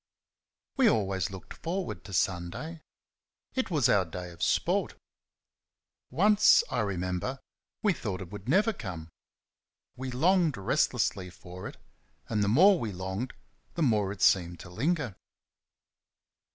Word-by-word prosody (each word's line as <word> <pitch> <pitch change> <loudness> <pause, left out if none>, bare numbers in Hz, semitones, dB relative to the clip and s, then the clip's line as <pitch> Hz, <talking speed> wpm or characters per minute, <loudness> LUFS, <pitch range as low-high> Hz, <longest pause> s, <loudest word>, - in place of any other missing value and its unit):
We 260 -4 +6
always 95 - 0
looked 95 -3 -9
forward 170 - -4
to 100 - -10
Sunday. 95 - -2 0.7
It 260 - -1
was 150 -8 +3
our 100 -6 +4
day 90 +1 -7
of 85 - -14
sport. - - +1 1.1
Once, 210 +4 +5
I 125 - 0
remember, 95 +4 -2 0.5
we 205 -3 +4
thought 100 - -4
it 95 -2 -8
would 105 +2 -8
never 205 +8 +3
come. 85 - -7 0.9
We 130 +1 -5
longed 165 - +2
restlessly 95 -1 0
for 90 0 -9
it, - - -10 0.5
and 105 -2 0
the - - +1
more 180 - +6
we 110 - -3
longed 95 +6 -4 0.4
the 170 - 0
more 105 -7 +2
it 100 - -4
seemed 85 -2 +3
to 90 - -11
linger. 140 - -1
105 Hz, 135 wpm, -29 LUFS, -, 1.1 s, We